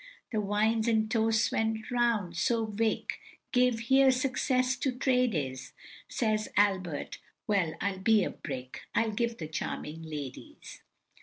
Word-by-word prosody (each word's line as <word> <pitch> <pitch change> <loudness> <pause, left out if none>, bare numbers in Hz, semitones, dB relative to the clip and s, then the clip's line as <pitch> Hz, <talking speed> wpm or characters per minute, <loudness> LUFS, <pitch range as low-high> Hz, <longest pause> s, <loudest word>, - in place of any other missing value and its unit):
The 215 -3 0
wine 220 +3 +1
and 220 -1 +1
toasts 225 -1 +2
went 220 0 -1
round, 230 -8 +1
so 225 +5 +1
Vic. 220 +1 -1 0.3
Gave, 250 -3 +3
"Here, 265 +3 +5
success 255 0 +1
to 265 +1 0
trade 250 -3 +1
is," 130 -3 -4 0.4
Says 215 -2 0
Albert, 185 -7 +1 0.3
"Well, 190 -7 +1
I'll 200 -1 -2
be 215 +1 +4
a - - -2
brick, 130 -3 -7
I'll 225 -1 +2
give 235 +2 -1
'The 155 -2 -6
charming 155 0 -4
ladies. 150 -5 -8
220 Hz, 140 wpm, -30 LUFS, 190-240 Hz, 0.4 s, Here